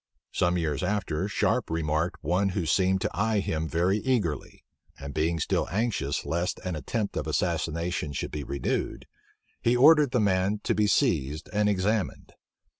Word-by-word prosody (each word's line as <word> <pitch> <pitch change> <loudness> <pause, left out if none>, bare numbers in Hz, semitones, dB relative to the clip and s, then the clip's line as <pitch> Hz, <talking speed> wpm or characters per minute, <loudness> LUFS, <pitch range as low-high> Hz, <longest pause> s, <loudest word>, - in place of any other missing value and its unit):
Some 90 0 +1
years 75 -5 -1
after, 95 -4 -1
Sharpe 100 - 0
remarked 80 +2 -1
one 90 +6 +1
who 90 - 0
seemed 95 +3 +2
to - - 0
eye 110 +2 +1
him 80 -4 -2
very 90 +6 +1
eagerly; 105 - -2 0.3
and 70 0 -7
being 80 +1 0
still - - 0
anxious 100 - -1
lest 85 +2 -1
an 90 -2 -2
attempt 100 - -3
of - - -2
assassination 85 -1 -1
should 70 - -4
be 75 -1 -4
renewed, 70 +1 -2 0.6
he 120 +1 +3
ordered 150 +2 +7
the 125 - +1
man 100 0 +1
to - - +1
be 105 -1 +2
seized 80 - +1
and 105 0 +2
examined. 100 +1 -1
90 Hz, 160 wpm, -27 LUFS, 80-105 Hz, 0.6 s, ordered